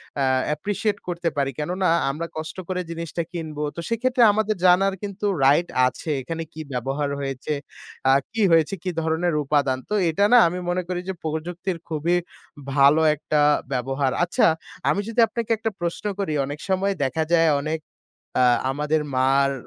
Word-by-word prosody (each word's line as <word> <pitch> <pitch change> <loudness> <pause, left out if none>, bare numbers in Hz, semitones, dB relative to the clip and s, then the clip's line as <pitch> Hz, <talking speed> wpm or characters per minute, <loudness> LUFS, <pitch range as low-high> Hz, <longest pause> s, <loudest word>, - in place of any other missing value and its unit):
অ্যা 140 -2 +1 0.3
appreciate 205 +4 -2
করতে 170 -1 -1
পারি। 135 -1 +1
কেননা 180 +4 -1 0.2
আমরা 165 +3 -4
কষ্ট 155 +3 -6
করে 180 0 -1
জিনিসটা 170 0 -4
কিনব 160 -4 -6 0.2
তো - - -6
সেক্ষেত্রে 245 +1 +2
আমাদের 215 0 0
জানার 190 +2 +5
কিন্তু 205 0 -4 0.2
right 150 +6 +4 0.2
আছে 155 - -6
এখানে 165 +5 -4
কি 155 - -7
ব্যবহার 135 +4 -2
হয়েছে? 135 +2 -3 0.5
আ - - +7 0.2
কি 225 - -1
হয়েছে? 165 +3 +3
কি 185 - -2
ধরনের 160 +1 0
উপাদান? 140 -2 +1
তো - - -2 0.2
এটা 200 +6 +2
না - - +9
আমি 180 +2 -3
মনে 180 0 0
করি 180 -1 -2
যে - - -1
প্রযুক্তির 170 +3 -3
খুবই 165 +3 +1 0.6
ভালো 140 +3 +6
একটা 150 +1 0 0.3
ব্যবহার। 135 +2 0
আচ্ছা, 175 - +3 0.4
আমি 200 - +1
যদি 230 +1 -3
আপনাকে 230 -1 -4
একটা 225 0 -2
প্রশ্ন 170 +4 -3
করি, 160 -6 -1
অনেক 145 +2 -6
সময় 195 +1 +1
দেখা 160 +4 0
যায় 165 -1 +5
অনেক 155 +2 -2 0.6
আ - - +5 0.3
আমাদের 150 +3 0 0.2
মার 135 +1 +3
165 Hz, 165 wpm, -23 LUFS, 145-185 Hz, 0.6 s, না